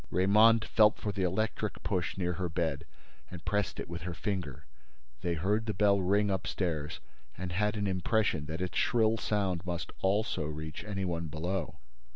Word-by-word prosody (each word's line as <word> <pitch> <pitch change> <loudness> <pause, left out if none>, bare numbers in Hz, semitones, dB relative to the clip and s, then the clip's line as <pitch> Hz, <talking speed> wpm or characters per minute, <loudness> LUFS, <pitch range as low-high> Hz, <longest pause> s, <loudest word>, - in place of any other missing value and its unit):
Raymonde 110 +4 +5
felt 105 -1 +4
for 105 - -3
the 100 -1 -3
electric 105 +3 -1
push 90 -1 -1
near 90 -2 0
her 90 +1 -2
bed 80 -4 -1 0.4
and 90 -3 -9
pressed 105 -2 0
it - - -4
with 85 0 -6
her 85 0 -4
finger. 90 - -3 0.6
They 85 -1 0
heard 105 +7 0
the 110 - -1
bell 100 -1 +4
ring 100 +2 +2
upstairs 85 -5 -2 0.4
and 90 +1 -4
had 105 +4 0
an 105 - -1
impression 95 -4 +1
that 80 +3 -4
its 90 - -1
shrill 115 -2 +3
sound 95 -6 0
must 85 -2 -4
also 100 -4 +1
reach 75 +1 -5
any 100 -2 -3
one 85 -2 -2
below. 85 +3 -3
95 Hz, 175 wpm, -31 LUFS, 85-105 Hz, 0.6 s, Raymonde